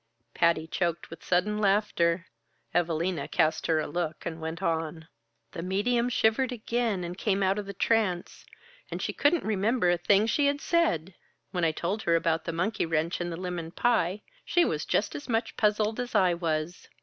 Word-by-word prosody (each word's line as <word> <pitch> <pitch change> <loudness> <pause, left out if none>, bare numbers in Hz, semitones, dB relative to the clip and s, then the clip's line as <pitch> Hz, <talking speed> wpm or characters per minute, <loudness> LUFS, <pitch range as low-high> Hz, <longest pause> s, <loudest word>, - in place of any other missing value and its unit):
Patty 170 -2 +2
choked 170 0 -2
with 165 - -10
sudden 195 +4 +1
laughter. 195 -4 +2 0.5
Evalina 170 -2 0
cast 160 -2 +1
her 160 -1 +3
a 155 - -1
look 170 0 -3
and 165 -1 -5
went 160 +1 -4
on. 160 -1 -2 0.4
"The - - -6
medium 235 +7 +1
shivered 245 +2 +2
again 230 -4 -1
and 175 +1 -5
came 195 0 0
out 190 +2 +2
of 205 - -6
the 200 - -5
trance, 200 -4 0 0.5
and - - -4
she - - -2
couldn't 310 +3 +2
remember 210 -1 +1
a 175 - +1
thing 200 +4 +4
she 280 +5 +2
had 285 0 +1
said! 195 - +1 0.4
When 180 -2 -2
I 165 - +3
told 185 +7 -2
her 170 -4 +2
about 165 -1 +1
the 170 - -2
monkey 180 +3 -1
wrench 165 +2 0
and 175 0 -2
the 165 - -5
lemon 175 -2 -4
pie, 205 -1 +1 0.2
she 350 -1 +3
was - - -2
just - - 0
as 290 - -7
much 225 0 -1
puzzled 215 +1 +1
as 245 0 -4
I 185 -2 +4
was. 165 0 -3
180 Hz, 185 wpm, -28 LUFS, 165-215 Hz, 0.5 s, thing